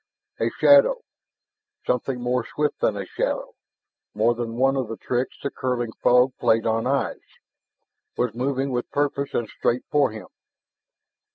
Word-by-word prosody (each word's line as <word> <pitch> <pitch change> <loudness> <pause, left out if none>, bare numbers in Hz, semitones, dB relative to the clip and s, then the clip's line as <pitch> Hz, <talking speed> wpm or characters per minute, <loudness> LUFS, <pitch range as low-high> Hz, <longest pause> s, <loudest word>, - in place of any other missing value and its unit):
A - - +1
shadow 465 - +6 0.8
something 125 +1 -1
more 125 0 0
swift 150 +5 -2
than 105 - +1
a 100 - -4
shadow, - - -3 0.6
more 110 +3 +3
than 115 -1 -4
one 135 +2 +2
of 130 -3 -1
the 115 0 -6
tricks 125 +1 -2
the 140 - -2
curling 120 -3 -2
fog 125 +1 +4
played 110 0 +2
on 115 +1 0
eyes 140 +1 -1 1.0
was 125 -3 0
moving 135 +2 -1
with 120 -1 -2
purpose 140 -1 -1
and 120 - 0
straight 120 +3 -1
for 145 -1 +3
him. 110 0 -9
125 Hz, 150 wpm, -24 LUFS, 115-135 Hz, 1.0 s, shadow